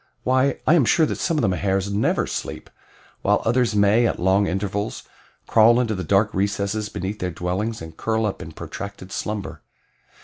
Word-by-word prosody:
Why, 130 +1 +2
I - - +5
am 165 -5 +5
sure 160 - +4
that - - -3
some 165 -3 0
of 150 - +1
the - - +3
Mahars 95 +1 0
never 105 - +1
sleep, - - -6 0.5
while - - +2
others 120 -1 +2
may, 105 +4 +4
at - - -2
long 95 +3 +3
intervals, 100 +2 -3 0.4
crawl 115 +2 +5
into 115 -3 0
the 95 -2 -3
dark 100 +4 +2
recesses 100 +2 -1
beneath 95 +4 -5
their 90 - -2
dwellings 90 +4 -3
and 80 -1 -10
curl 110 +3 -1
up 105 - -3
in - - -8
protracted 100 -2 -8
slumber. 105 -1 -4
105 Hz, 180 wpm, -23 LUFS, 95-115 Hz, 0.5 s, I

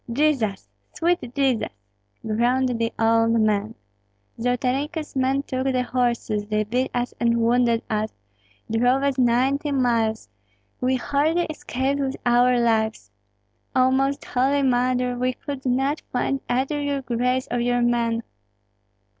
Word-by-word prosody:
"Jesus! 240 -7 0 0.3
sweet 345 +1 +1 0.2
Jesus!" 270 -5 +1 0.6
groaned 240 +4 +1
the 230 0 0
old 225 0 +3
man. 215 0 +1 0.6
"Zolotarenko's 265 +7 -1
men 265 +1 +1
took 260 -2 -3
the 255 -2 +1
horses; 235 -4 -1
they 215 0 0
beat 250 +5 -1
us 245 0 -2
and 235 0 +2
wounded 235 0 +2
us, 215 0 -1 0.6
drove 245 +4 +2
us 275 -2 0
ninety 260 +4 +2
miles; 230 -5 +1 0.5
we 255 +1 +1
hardly 295 +6 +1
escaped 275 -1 -2
with 270 -1 -1
our 245 +1 +4
lives. 220 -2 0 0.6
Oh, 255 0 +4
Most 270 +2 0
Holy 275 +3 +1
Mother! 250 -1 +1
we 250 +1 0
could 270 0 -6
not 270 +4 0
find 265 +2 -1
either 270 +4 0
your 285 -1 -2
grace 250 +1 0
or 245 - 0
your 245 0 +1
men. 235 -1 +1
250 Hz, 130 wpm, -23 LUFS, 235-270 Hz, 0.6 s, our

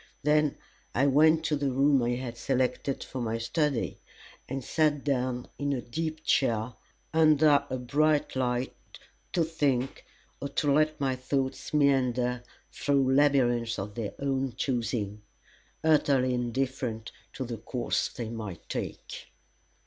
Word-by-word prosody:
Then 150 0 +3 0.4
I 135 - +3
went 155 +3 +4
to 150 0 +1
the 140 -1 0
room 135 +1 +4
I 120 +1 +1
had 125 -1 -5
selected 130 +2 -1
for 130 - -6
my 115 -1 -1
study, 140 +2 -1 0.5
and 135 0 -3
sat 150 +1 +1
down 125 -3 -1
in 140 0 0
a 130 - -2
deep 155 +4 -4
chair, 115 -5 +1 0.4
under 155 -2 +5
a 130 - -2
bright 145 +4 +1
light, 125 0 0 0.6
to 170 - +3
think, 145 -6 -1 0.4
or 140 - -3
to 140 0 +1
let 155 +1 +2
my 135 -2 0
thoughts 130 +1 -2
meander 125 -4 +2 0.3
through 135 -2 +1
labyrinths 120 -5 +3
of 100 +2 -5
their 105 -2 -4
own 135 -2 -1
choosing, 115 -5 -2 0.6
utterly 140 -5 +3
indifferent 125 -2 -2 0.2
to 130 - -4
the 115 -1 -5
course 120 +3 -1
they 120 -3 -6
might 110 -7 -7
take. - - -5
135 Hz, 135 wpm, -28 LUFS, 120-145 Hz, 0.6 s, under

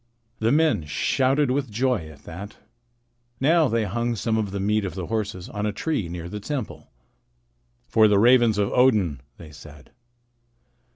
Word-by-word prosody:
The 110 +1 +1
men 145 - +2
shouted 135 - +1
with 135 -1 -1
joy 115 -7 -1
at 75 -3 -15
that. 100 +5 -9 0.8
Now 160 +3 +3
they 115 -1 0
hung 120 +4 -2
some 110 +1 -1
of 110 -2 -1
the 100 +1 -4
meat 105 +2 +1
of 95 - -5
the 95 -2 -4
horses 105 -4 -3
on 105 0 -3
a - - -1
tree 110 - -2
near 85 0 -6
the 105 +4 -6
temple. 130 +1 -6 1.0
"For 110 - +4
the 105 -1 +3
ravens 120 0 +5
of 100 -1 0
Odin," 105 - +2 0.2
they 80 -3 -12
said. 75 -1 -14
105 Hz, 165 wpm, -24 LUFS, 95-125 Hz, 1.0 s, ravens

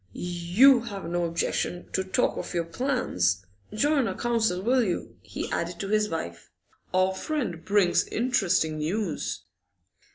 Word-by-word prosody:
'You 180 +10 +4
have 200 -6 -6
no 175 0 0
objection 170 +1 -2
to 190 - +1
talk 190 - +1
of - - -5
your 170 - +1
plans? 165 - 0 0.3
Join 280 +3 +2
our - - -3
council, 225 -6 +1
will 250 +3 +3
you?' 180 -5 -3
he - - -5
added 170 +1 -2
to 195 - -4
his 215 0 +2
wife. 85 - -5 0.4
'Our 185 +1 +2
friend 190 - -3
brings 200 -3 +3
interesting 195 -10 +1
news. 175 +3 -2
185 Hz, 140 wpm, -27 LUFS, 170-230 Hz, 0.4 s, You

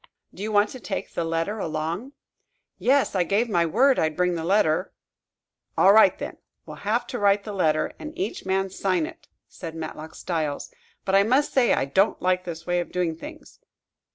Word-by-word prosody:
"Do - - -11
you 215 +1 -3
want 205 0 +3
to 260 - -8
take 190 - -5
the 170 - -1
letter 165 +6 -2
along?" 165 - -3 0.7
"Yes; 275 +2 +2
I 190 - +2
gave 205 +7 +1
my 170 -6 +2
word 255 - +3
I'd 155 -1 0
bring 180 0 +2
the 165 -1 -3
letter." 185 -1 +1 0.8
"All 195 - +6
right, 215 -4 +6
then; - - -6 0.3
we'll - - -9
have 230 +4 -1
to 245 - -5
write 200 0 +3
the 210 - -6
letter, 155 -5 +1
and 305 - -7
each 370 0 -3
man 190 0 0
sign 185 -4 0
it," - - -11 0.2
said 165 -3 -8
Matlock 155 0 -7
Styles. 160 - -3 0.3
"But, 190 - -1
I 195 - +7
must 260 +8 +2
say, 255 -3 +4
I - - +1
don't 190 +9 +2
like 185 0 0
this 165 -1 -7
way 175 0 +1
of 175 - -4
doing 175 -3 -1
things." 165 - -11
190 Hz, 195 wpm, -25 LUFS, 165-215 Hz, 0.8 s, I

